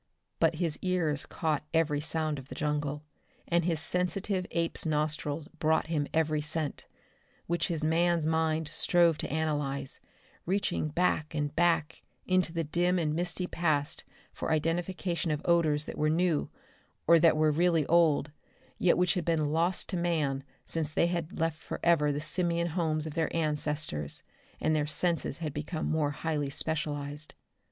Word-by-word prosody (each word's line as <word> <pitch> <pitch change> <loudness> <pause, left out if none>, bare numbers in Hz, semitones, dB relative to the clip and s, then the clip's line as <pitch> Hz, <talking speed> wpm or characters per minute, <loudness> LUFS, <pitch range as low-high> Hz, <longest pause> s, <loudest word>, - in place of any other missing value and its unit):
But - - +3
his 165 -4 -1
ears 170 -6 0
caught 155 -3 -1
every 155 -3 +2
sound 155 -1 -1
of 135 - -12
the - - -8
jungle, 150 -1 -2 0.4
and 170 0 +2
his 165 -3 +1
sensitive 180 +3 0
ape's 170 -1 0
nostrils 150 -1 -1
brought 160 0 +2
him 145 -2 0
every 155 -1 +1
scent 150 0 -3 0.6
which 170 0 0
his 160 -3 -1
man's 170 0 +2
mind 160 0 +1
strove 170 -3 +3
to - - -3
analyze, 145 -3 -1 0.5
reaching 190 -4 0
back 155 -1 0
and 145 -1 -2
back 165 -2 +1 0.2
into 185 -2 +2
the 165 0 -1
dim 175 +4 +1
and 155 -3 0
misty 175 +2 -1
past 155 -5 0 0.3
for - - -3
identification 170 +2 -1
of 150 -1 0
odors 155 -4 +3
that - - -7
were 155 - +2
new, 165 -1 +1 0.6
or 170 +1 +6
that 160 -1 +5
were 155 0 +4
really 165 -1 +2
old, 155 -3 +3 0.5
yet 180 - +4
which 180 0 +3
had 180 - -1
been 155 -3 +1
lost 170 +3 +1
to 185 - -1
man 155 -6 0 0.2
since 160 -2 0
they 160 - +2
had 170 +1 -3
left 160 -1 -1
forever 160 -4 +2
the 145 - -2
simian 170 +2 0
homes 160 -2 -1
of 155 - -5
their 160 -1 0
ancestors 150 - -1 0.4
and 155 0 +1
their 150 -1 0
senses 155 -2 0
had 155 -4 -4
become 155 +2 -4
more 155 -2 +1
highly 150 -1 -2
specialized. 150 0 -2
160 Hz, 160 wpm, -30 LUFS, 150-170 Hz, 0.6 s, or